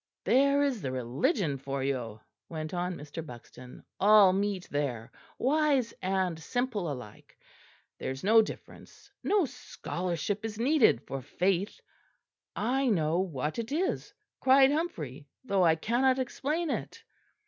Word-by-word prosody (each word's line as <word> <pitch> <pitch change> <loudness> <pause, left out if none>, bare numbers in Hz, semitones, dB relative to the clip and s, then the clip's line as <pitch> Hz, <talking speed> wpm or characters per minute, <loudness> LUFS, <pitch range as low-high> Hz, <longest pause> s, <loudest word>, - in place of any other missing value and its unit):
There 280 +2 +4
is 265 -7 0
the 130 - -3
Religion 140 - 0
for 135 0 -3
you!" 120 -5 -3 0.3
went 155 -1 -5
on 180 0 -2
Mr. 150 +2 -7
Buxton; 125 -2 -12 0.2
"all 205 -2 +7
meet 195 -1 -1
there, 130 -6 -2 0.3
wise 280 -3 +2
and 185 -3 0
simple 210 - -2
alike. 125 -6 -10 0.6
There - - -3
is 130 +1 -6
no 220 +3 +6
difference; 215 - -9
no 405 -4 +3
scholarship 200 - -4
is 220 -2 -4
needed 250 - +4
for 135 - -5
faith. 185 - -1 0.8
'I 260 +4 +1
know 165 -4 +1
what 155 - -2
it 230 +2 -4
is,' 360 +6 -1 0.3
cried 265 +1 +6
Humphrey, 155 - -3 0.2
'though 195 -6 +2
I 165 -2 +5
cannot 250 +9 +2
explain 295 +5 -2
it!'" - - -5
190 Hz, 135 wpm, -29 LUFS, -, 0.8 s, all